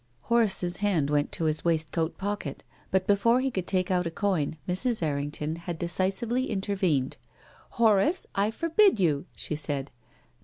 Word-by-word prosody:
Horace's 205 - +2
hand 175 -9 +1
went 145 -1 +1
to - - -2
his 155 -1 0
waistcoat 165 0 -1
pocket, 200 -8 -4 0.3
but 190 0 +1
before 205 +5 +3
he 265 +1 0
could 185 -5 -3
take 185 -1 0
out 180 -1 +1
a - - -1
coin 165 -4 -1
Mrs. 205 +3 0
Erring 145 -2 -1
ton 150 +2 -4
had 170 0 -5
decisively 195 +9 0
intervened. 190 - 0 0.3
" - - -26
Horace, 225 - +3
I 200 +2 +1
forbid 335 - +3
you," 150 -6 +1
she - - -3
said. 145 -2 -3
185 Hz, 160 wpm, -27 LUFS, 155-205 Hz, 0.3 s, before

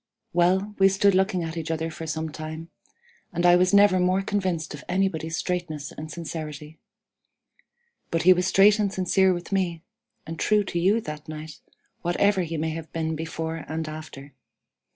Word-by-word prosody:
"Well, 185 +4 +2
we 195 0 +6
stood 195 +1 +3
looking 190 -1 +1
at 160 0 -5
each 165 -1 -4
other 160 0 -2
for 160 +1 -7
some 160 0 -3
time, 155 +2 -7 0.6
and 175 +1 -1
I 175 0 +7
was 180 +1 +3
never 200 -2 +6
more 185 +2 +2
convinced 185 -7 -2
of 150 - -9
anybody's 175 -3 -1
straightness 175 -5 -3
and 155 0 -8
sincerity; 155 -2 -7 1.3
but 165 - 0
he 185 +2 +8
was 180 0 0
straight 205 +3 +5
and 205 -2 +1
sincere 190 0 +2
with 175 +1 -4
me, 175 -4 -1 0.4
and 160 +1 -7
true 210 -1 +3
to 175 -3 -3
you 200 +6 +3
that 150 -4 -8
night, 155 0 -8 0.4
whatever 190 +3 +2
he 165 -2 -3
may 160 +1 -1
have 160 0 -7
been 160 -1 -2
before 160 +1 -4
and 160 +1 -3
after. 155 -3 -9
170 Hz, 175 wpm, -25 LUFS, 160-190 Hz, 1.3 s, he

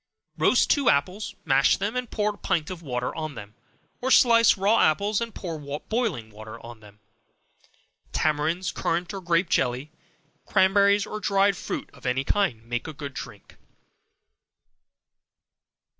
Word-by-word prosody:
Roast - - +3
two 280 -4 +3
apples, 185 +9 0
mash 135 -2 +4
them 205 +4 -3
and 250 -2 -3
pour 210 0 -1
a - - -16
pint 165 -2 -1
of 180 -2 -7
water 125 -5 -3
on 155 -3 -5
them; 105 -2 -10 0.5
or 260 - -1
slice 230 -4 +6
raw 200 +4 +3
apples, 200 +8 +2
and 230 -2 -5
pour 165 -4 -5 0.2
boiling 200 - -2
water 110 +1 -10
on 120 -1 -10
them. 105 -1 -17 1.1
Tamarinds, 155 +4 0
currant 175 +3 -2
or 195 - -5
grape 170 0 +1
jelly, 130 +1 0 0.6
cranberries, 200 +1 +4
or 215 - -6
dried 200 0 +2
fruit - - -5
of - - -9
any 130 +2 0
kind, 135 - 0
make 120 +3 -4
a 155 - -6
good 140 -1 -7
drink. - - -10
170 Hz, 145 wpm, -25 LUFS, 135-205 Hz, 1.1 s, slice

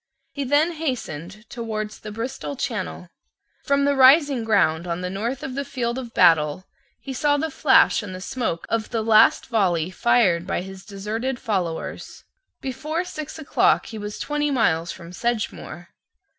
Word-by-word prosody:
He 285 - -4
then 290 +6 +3
hastened 215 - -5
towards 215 -2 -5
the 215 - -8
Bristol 255 +6 -5
Channel. 225 -9 -4 0.6
From 280 -1 +2
the 285 - +3
rising 270 -1 +6
ground 180 -6 +2
on 170 +1 -3
the 180 0 -3
north 235 +7 -3
of 260 - -4
the 280 +2 -2
field 245 -2 -3
of 240 -3 -8
battle 155 +2 +4 0.3
he 270 - -7
saw 290 +2 +2
the 315 +2 -2
flash 270 -3 +4
and 195 -3 -7
the - - -7
smoke 205 -5 -3
of 225 -1 -1
the 225 -2 -1
last 215 -1 +5
volley 185 -8 +1
fired 185 -5 +2
by 185 - -1
his 190 0 -10
deserted 215 +6 -3
followers. 180 -7 -4 0.4
Before 305 +6 -3
six 310 -3 -7
o'clock 315 -1 +2
he 220 - -7
was 210 0 -6
twenty 295 0 -1
miles 175 - +1
from 170 -1 -10
Sedgemoor. 215 -6 -3
225 Hz, 160 wpm, -23 LUFS, 185-270 Hz, 0.6 s, rising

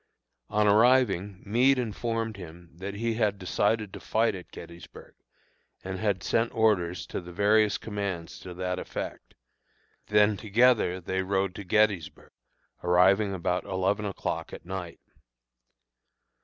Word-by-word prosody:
On 105 0 +2
arriving, 105 -4 +3
Meade 125 +6 +3
informed 115 -1 -2
him 85 -2 -11
that 95 +4 -7
he 115 +2 -1
had 105 -3 0
decided 105 +2 0
to - - -7
fight 115 0 +1
at 90 -2 -9
Gettysburg, 85 0 -12 0.7
and 95 0 -5
had 100 -4 -1
sent 115 +1 +1
orders 90 -6 +1
to - - -5
the 90 0 -10
various 105 +3 +3
commands 100 -6 -5
to 90 -1 -9
that 90 0 -2
effect; - - -7 0.7
then 105 0 +4
together 110 -3 +3
they 95 +2 -2
rode 95 0 0
to 100 - -7
Gettysburg, 100 -4 0 0.5
arriving 95 +4 +4
about 90 0 -1
eleven 95 +3 -1
o'clock 100 - -4
at - - -9
night. 90 -2 -6
100 Hz, 130 wpm, -27 LUFS, 90-110 Hz, 0.7 s, then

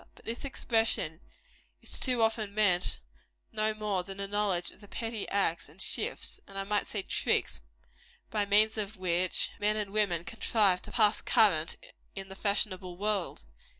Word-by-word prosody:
But - - -20
by - - -2
this 235 - -8
expression 225 - 0 0.6
is - - -4
too 250 -3 +1
often 220 -2 0
meant 185 -4 +2 0.5
no 215 0 0
more 210 -3 -1
than 195 +2 -8
a 200 - 0
knowledge 200 -4 +1
of - - -18
the 205 - -13
petty 225 0 -4
acts 170 -6 0
and 160 +5 -19
shifts, - - -1
and 195 - -8
I 195 - -1
might 205 +1 0
say 205 -3 -1
tricks, - - 0 0.7
by 205 -2 0
means 215 +2 +4
of 210 0 -4
which 180 0 +2
men 210 +1 +2
and 205 -2 -3
women 200 -6 +1
contrive 205 -2 +2
to - - -9
pass 210 0 +4
current 165 -7 +3 0.4
in 195 0 -7
the 190 - -7
fashionable 195 -3 -1
world. 200 - -2
205 Hz, 170 wpm, -30 LUFS, 185-215 Hz, 0.7 s, means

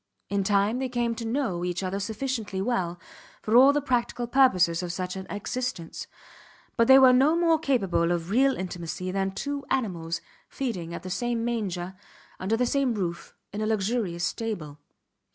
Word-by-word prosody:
In 200 0 0
time 205 +4 +2
they 260 -1 -2
came 240 -1 0
to 230 0 -6
know 225 -9 -1
each 180 +1 -2
other 190 +1 -2
sufficiently 220 -1 -3
well 185 -5 -1 0.4
for 215 - +1
all 265 +3 +8
the 290 -1 0
practical 245 -2 0
purposes 190 -10 +3
of 175 -1 -3
such 180 +1 -4
an 190 0 -7
existence, 205 -3 -4 0.7
but 230 -1 +3
they 265 - +9
were 260 -1 +7
no 275 +6 +4
more 335 -2 +3
capable 195 - +1
of 170 +1 -2
real 265 +4 +4
intimacy 180 0 -4
than 195 0 0
two 280 +8 -4
animals 170 -9 -1 0.3
feeding 180 -11 -4
at - - -8
the 185 - -6
same 235 +3 -1
manger, 190 -6 -2 0.5
under 205 +4 0
the 250 - +2
same 265 -1 +1
roof, 175 -4 -4 0.2
in 210 - -3
a 215 - 0
luxurious 205 -4 -1
stable. 160 -7 -3
215 Hz, 170 wpm, -26 LUFS, 180-250 Hz, 0.7 s, they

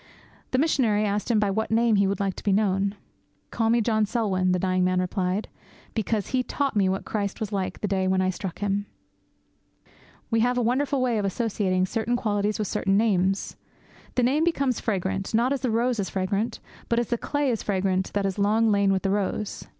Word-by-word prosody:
The 255 - 0
missionary 245 -8 +2
asked 205 +2 -1
him 225 -3 +3
by 205 -2 +1
what 220 +3 -1
name 230 0 +3
he 200 0 +3
would 200 +2 -1
like 195 -1 0
to - - -8
be 205 - +1
known. 195 0 +1 0.6
'Call 225 -1 0
me 235 +1 +3
John 220 -1 +1
Selwyn,' 195 -5 0
the 180 - +2
dying 185 0 +1
man 185 0 +2
replied, 185 +2 -1 0.5
'because 220 -1 -1
he 255 - +1
taught 275 0 -2
me 195 -2 +3
what 190 +1 -2
Christ 200 -1 -3
was 215 -2 -3
like 195 -2 -3
that 210 - -2
day 190 -1 0
when 190 0 +2
I 185 0 +2
struck 185 -1 -6
him.' 205 0 -1 1.4
We 225 - +3
have 245 +2 +2
a - - +2
wonderful 260 +3 +1
way 240 -4 +1
of 205 - -1
associating 195 -3 0
certain 225 +5 -1
qualities 210 -2 0
with 215 -2 -2
certain 195 +2 +1
names. 195 -3 +1 0.6
The 250 - +2
name 280 +6 +2
becomes 275 -7 +1
fragrant, 195 -1 -2
not 245 +4 +3
as 275 - -3
the 255 - 0
rose 235 +1 +1
is 195 - -1
fragrant, 200 +4 -1 0.3
but 235 - +1
as 240 -1 0
the 240 - +1
clay 290 -2 0
is 225 - -2
fragrant 190 -1 0
that 200 -1 0
has 195 +1 -2
long 215 +2 +3
lain 200 -1 +3
with 190 -1 0
the 195 - +1
rose. 205 +1 -2
210 Hz, 210 wpm, -25 LUFS, 195-230 Hz, 1.4 s, him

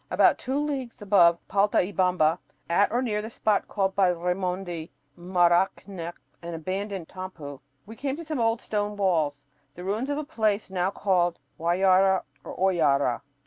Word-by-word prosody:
About - - +4
two 265 +2 -2
leagues 280 -5 -3
above 175 -4 +5
Paltaybamba, 185 -4 +2 0.3
at 175 +4 +3
or 245 +3 +1
near 210 -4 -1
the 220 - -6
spot 215 -2 0
called 195 -2 -1
by 195 -2 +4
Raimondi 180 -1 -3 0.3
"Maracnyoc," 175 0 +1 0.3
an 170 0 -6
"abandoned 190 +2 -4
tampu," 170 -7 -8 0.3
we 225 - -10
came 270 +2 -3
to 335 - -7
some 305 -3 -3
old 225 0 +1
stone 210 -1 -2
walls, 155 -8 0 0.3
the 180 - -8
ruins 215 +8 -2
of 290 - -1
a 305 - -2
place 220 -9 -1
now 185 0 0
called 180 -4 +1 0.2
Huayara 185 +2 +3 0.2
or - - -8
"Hoyara." 145 -10 +2
190 Hz, 150 wpm, -26 LUFS, 175-210 Hz, 0.3 s, above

